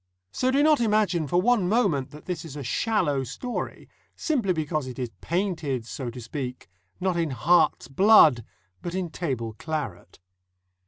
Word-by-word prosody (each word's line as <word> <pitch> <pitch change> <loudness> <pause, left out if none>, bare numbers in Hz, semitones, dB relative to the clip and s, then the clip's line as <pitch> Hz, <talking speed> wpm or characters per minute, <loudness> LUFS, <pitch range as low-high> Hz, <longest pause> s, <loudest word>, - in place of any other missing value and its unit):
So 255 - 0
do 275 +2 +3
not 305 -3 +4
imagine 210 -8 +2
for 175 +6 +2
one 210 -3 +2
moment 190 - +1
that 150 - -13
this 175 -4 -4
is 155 -4 -9
a 145 - -5
shallow 145 - 0
story, 240 - -5 0.3
simply 250 - 0
because 155 -4 -2
it 125 - -8
is 125 -3 -4
painted, 160 - -2
so 125 +1 -5
to 120 +2 -8
speak, 125 +1 -6 0.3
not 185 -2 0
in 165 -2 0
heart's 160 0 +2
blood 150 - +6 0.4
but 175 +1 -5
in 180 -3 -3
table 130 -10 -3
claret. 140 - -5
160 Hz, 160 wpm, -26 LUFS, 130-195 Hz, 0.4 s, blood